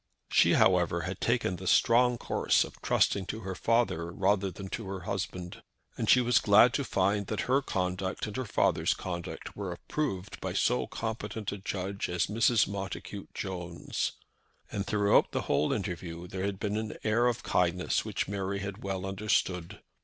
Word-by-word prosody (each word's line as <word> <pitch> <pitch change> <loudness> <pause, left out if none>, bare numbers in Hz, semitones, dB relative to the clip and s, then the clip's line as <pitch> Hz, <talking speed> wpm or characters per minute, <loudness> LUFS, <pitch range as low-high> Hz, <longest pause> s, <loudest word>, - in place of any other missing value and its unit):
She, - - +5
however, 85 -2 +3
had 95 +2 -5
taken 115 -6 +1
the 95 - -7
strong 120 +3 +4
course - - +2
of - - -11
trusting 95 -2 +2
to 110 - -4
her 95 -2 -4
father 105 -6 +1
rather 100 +1 +1
than 95 +2 -8
to 110 0 -5
her 95 -1 -5
husband, 90 -2 -4 0.3
and - - -2
she 125 - +7
was 120 -1 +4
glad 110 +4 +6
to 140 - 0
find 100 -3 +1
that 105 -4 -2
her 135 +2 +2
conduct 95 -5 -2
and 105 - -6
her 130 - -2
father's 105 - +2
conduct 85 -2 -6
were 100 -3 -4
approved 95 - -4
by 95 -1 -3
so 125 +5 +1
competent 110 -2 -4
a 100 - -5
judge 100 0 -3
as 90 -1 +1
Mrs. 115 +1 +3
Montacute 100 0 -6
Jones. 90 -3 -3 0.6
And 100 -1 -3
throughout 105 -1 +3
the - - 0
whole 75 - +1
interview 90 -3 -4
there 95 +1 -3
had 100 -1 -3
been 105 0 -1
an 110 0 -4
air 115 +3 +3
of 120 - -1
kindness 90 0 +1
which - - -2
Mary 100 0 -2
had 100 +1 -5
well 95 -1 -3
understood. 95 -3 -1
100 Hz, 175 wpm, -30 LUFS, 90-110 Hz, 0.6 s, she